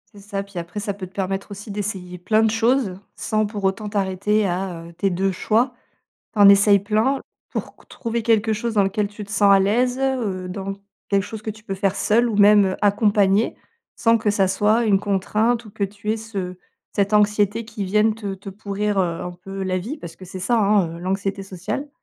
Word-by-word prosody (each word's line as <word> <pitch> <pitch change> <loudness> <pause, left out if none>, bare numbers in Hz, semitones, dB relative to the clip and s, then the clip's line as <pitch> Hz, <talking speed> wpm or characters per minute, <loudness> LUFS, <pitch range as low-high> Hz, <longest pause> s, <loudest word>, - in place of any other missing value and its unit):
C'est 200 - -12
ça, 200 0 -4
puis 200 -3 -7
après, 170 +4 -6
ça 205 -1 -3
peut 190 -2 -7
te - - -21
permettre 195 +1 -3
aussi 205 +1 -8
d'essayer 190 -3 -5
plein 215 +5 +2
de 220 - +3
choses 225 -4 +1 0.2
sans, 215 -1 0
pour 205 -1 -6
autant, 195 +2 0
t'arrêter 205 +1 0
à, 180 -2 -3
heu, 170 - -14
tes 195 +4 0
2 190 +2 0
choix. 230 +7 +1 0.6
T'en 205 -3 +7
essayes 200 0 +6
plein, 215 +7 +1 0.3
pour - - -5
qu - - -21
trouver 235 -1 -3
quelque 220 -1 +2
chose 225 +1 -2
dans 200 - +4
lequel 205 +1 0
tu 205 0 -8
te 200 - -15
sens 200 -1 +4
à 195 - +7
l'aise, 245 +6 +2
heu, 235 -9 -1
dans 195 +1 -4 0.3
quelque 200 -1 +2
chose 220 0 -8
que 215 - -3
tu 215 0 -12
peux 195 - -3
faire 195 0 0
seule, 235 +3 +2
ou 220 - -2
même 205 -2 +5
accompagnée, 205 0 +3 0.4
sans 230 -1 +3
que 215 -1 +1
ça 200 -2 +2
soit 210 +5 +2
une 200 -3 +3
contrainte 215 +4 0
ou 215 - -12
que 200 - -6
tu 205 +2 -5
aies - - -1
ce 195 -5 -5 0.4
cette 200 +1 0
anxiété 210 +1 +2
qui 220 -2 -5
vienne 210 +3 +2
te 205 -3 -4
te 195 +1 -9
pourrir, 205 +1 -2
heu, 170 -3 0
un 180 - -4
peu 195 +2 -7
la 185 0 0
vie, 230 - -5
parce 165 - -9
que 185 - -11
c'est 185 +1 -8
ça 235 +5 +2
hein, 200 -5 +2
heu, - - -10
l'anxiété 195 +2 -2
sociale. 195 +9 -5
205 Hz, 220 wpm, -22 LUFS, 195-215 Hz, 0.6 s, T'en